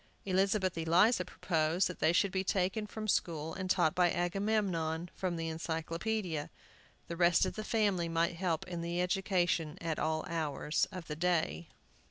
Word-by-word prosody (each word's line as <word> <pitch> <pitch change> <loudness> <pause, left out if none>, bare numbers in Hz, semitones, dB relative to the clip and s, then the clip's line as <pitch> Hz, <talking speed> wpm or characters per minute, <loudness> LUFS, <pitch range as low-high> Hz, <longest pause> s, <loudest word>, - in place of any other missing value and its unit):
Elizabeth 190 0 +1
Eliza 180 +6 +4
proposed 165 0 0
that 180 - -7
they 160 - +4
should 185 +3 +2
be 190 0 0
taken 195 +3 0
from 215 +1 -6
school 160 -5 0
and 185 -1 -4
taught 170 -4 +3
by 180 -1 +3
Agamemnon 175 -3 -1
from 185 -2 -2
the 165 0 -3
Encyclopædia. 165 +2 -3 0.6
The 170 - -4
rest 170 +1 +4
of 185 - -3
the 215 - -5
family 200 -6 +1
might 165 +1 +1
help 170 -3 -1
in 175 -2 -4
the 170 +1 -2
education 180 -3 0
at 165 -2 -2
all 155 0 0
hours 155 -2 -1
of 180 -3 -7
the 150 - -5
day. 170 0 0
175 Hz, 165 wpm, -33 LUFS, 165-190 Hz, 0.6 s, Eliza